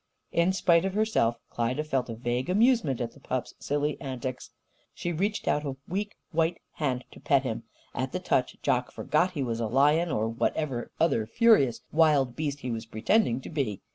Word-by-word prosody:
In 170 Hz, +2 st, +3 dB
spite 170 Hz, -3 st, +3 dB
of 195 Hz, 0 st, -2 dB
herself 210 Hz, -, +2 dB
Klyda 120 Hz, +5 st, -1 dB
felt 135 Hz, -5 st, -1 dB
a 115 Hz, -, -4 dB
vague 120 Hz, +4 st, -2 dB
amusement 215 Hz, -, +3 dB
at 120 Hz, -1 st, -2 dB
the -, -, -18 dB
pup's 130 Hz, -2 st, -3 dB
silly 145 Hz, +1 st, -1 dB
antics. 130 Hz, -1 st, -5 dB, 0.5 s
She 175 Hz, -, -3 dB
reached 200 Hz, +6 st, -1 dB
out 150 Hz, -, +2 dB
a 140 Hz, -2 st, -3 dB
weak 205 Hz, +3 st, -3 dB, 0.2 s
white 165 Hz, +1 st, +1 dB
hand 130 Hz, -5 st, -2 dB
to -, -, -13 dB
pet -, -, +2 dB
him. -, -, -4 dB, 0.3 s
At -, -, -2 dB
the -, -, -1 dB
touch, -, -, 0 dB
Jock -, -, +1 dB
forgot 180 Hz, +1 st, +1 dB
he 145 Hz, -5 st, -1 dB
was 115 Hz, -2 st, -2 dB
a 115 Hz, -, 0 dB
lion 150 Hz, +8 st, +3 dB
or 110 Hz, -7 st, 0 dB
whatever 120 Hz, +2 st, -1 dB
other 115 Hz, -10 st, +2 dB
furious 210 Hz, -, +4 dB
wild 145 Hz, -6 st, +3 dB
beast 145 Hz, -2 st, -3 dB
he 125 Hz, -, -3 dB
was 115 Hz, 0 st, -4 dB
pretending 120 Hz, -, +1 dB
to -, -, -8 dB
be. 135 Hz, -, -2 dB
140 Hz, 190 wpm, -28 LUFS, 120-170 Hz, 0.5 s, furious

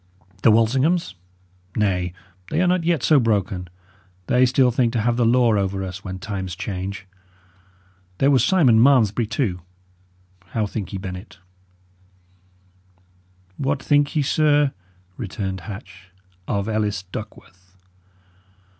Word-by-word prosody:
The -, -, +5 dB
Walsinghams? 130 Hz, -, +2 dB, 0.6 s
Nay, 90 Hz, -4 st, 0 dB, 0.4 s
they -, -, -1 dB
are 180 Hz, -, +3 dB
not 180 Hz, -1 st, +2 dB
yet 165 Hz, -5 st, +1 dB
so 155 Hz, -3 st, +5 dB
broken; 100 Hz, -6 st, 0 dB, 0.6 s
they 125 Hz, +5 st, +3 dB
still 125 Hz, 0 st, +3 dB
think 120 Hz, -1 st, +1 dB
to 115 Hz, -, 0 dB
have 120 Hz, +2 st, +1 dB
the 120 Hz, -1 st, +2 dB
law 120 Hz, -1 st, +4 dB
over 95 Hz, -1 st, -1 dB
us, 95 Hz, +1 st, -7 dB
when 95 Hz, -1 st, -6 dB
times 95 Hz, -2 st, -5 dB
change. 100 Hz, 0 st, -5 dB, 1.1 s
There 140 Hz, +1 st, +3 dB
was 130 Hz, -4 st, +4 dB
Simon 130 Hz, -10 st, +4 dB
Malmesbury, 120 Hz, -4 st, +4 dB
too. 105 Hz, -5 st, -2 dB, 0.9 s
How 110 Hz, -2 st, +1 dB
think 105 Hz, -1 st, -5 dB
ye, 100 Hz, -, -4 dB
Bennet?" 95 Hz, +1 st, -8 dB, 2.2 s
"What 140 Hz, 0 st, -1 dB
think 145 Hz, +1 st, +2 dB
ye, 150 Hz, -, +2 dB
sir," 145 Hz, -1 st, +2 dB, 0.4 s
returned 95 Hz, -3 st, -4 dB
Hatch, 95 Hz, -2 st, -10 dB, 0.4 s
"of 100 Hz, 0 st, -1 dB
Ellis 105 Hz, -2 st, -1 dB
Duckworth?" 95 Hz, -2 st, -11 dB
110 Hz, 125 wpm, -22 LUFS, 95-130 Hz, 2.2 s, The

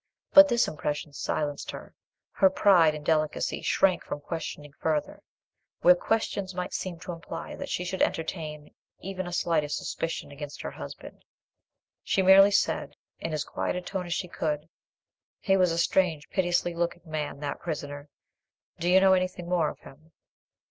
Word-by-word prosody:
But 290 Hz, 0 st, +10 dB
this 240 Hz, -3 st, +2 dB
impression 150 Hz, -1 st, -4 dB
silenced 145 Hz, 0 st, -3 dB
her: -, -, -8 dB, 0.4 s
her 190 Hz, -, +4 dB
pride 180 Hz, -5 st, +5 dB
and 150 Hz, -1 st, -8 dB
delicacy 155 Hz, -1 st, 0 dB
shrank 185 Hz, -2 st, +2 dB
from -, -, -5 dB
questioning 150 Hz, -2 st, -6 dB
further, 155 Hz, -2 st, -1 dB, 0.6 s
where 180 Hz, -, +8 dB
questions 195 Hz, -1 st, -1 dB
might 180 Hz, 0 st, -4 dB
seem 180 Hz, -3 st, -4 dB
to 180 Hz, 0 st, -6 dB
imply 165 Hz, 0 st, -7 dB
that -, -, -6 dB
she 180 Hz, -, -2 dB
could 190 Hz, +1 st, -3 dB
entertain 155 Hz, -2 st, -2 dB, 0.3 s
even 185 Hz, -1 st, -5 dB
a -, -, -6 dB
slight 170 Hz, -2 st, +1 dB
suspicion 165 Hz, +2 st, -3 dB
against 145 Hz, 0 st, -8 dB
her -, -, -4 dB
husband. -, -, -10 dB, 0.8 s
She 190 Hz, -, +1 dB
merely 195 Hz, +1 st, +8 dB
said, 200 Hz, -, 0 dB, 0.2 s
in 165 Hz, -, -4 dB
as 155 Hz, -2 st, -1 dB
quiet -, -, -3 dB
a 180 Hz, -, -2 dB
tone 180 Hz, 0 st, -4 dB
as 175 Hz, -, -1 dB
she 180 Hz, -, -3 dB
could— 155 Hz, -2 st, -3 dB, 0.7 s
"He 195 Hz, -, +2 dB
was 185 Hz, -2 st, +3 dB
a 165 Hz, -, -1 dB
strange 170 Hz, -2 st, +1 dB
piteous 175 Hz, -3 st, +1 dB
looking 175 Hz, 0 st, -2 dB
man, 155 Hz, -3 st, -4 dB
that 145 Hz, -1 st, -3 dB
prisoner. 145 Hz, -3 st, -5 dB, 0.7 s
Do 175 Hz, -, 0 dB
you 185 Hz, +1 st, +7 dB
know 190 Hz, 0 st, +5 dB
anything 185 Hz, -1 st, -1 dB
more 175 Hz, -3 st, +2 dB
of -, -, -11 dB
him?" 155 Hz, +4 st, -16 dB
170 Hz, 165 wpm, -27 LUFS, 150-185 Hz, 0.8 s, But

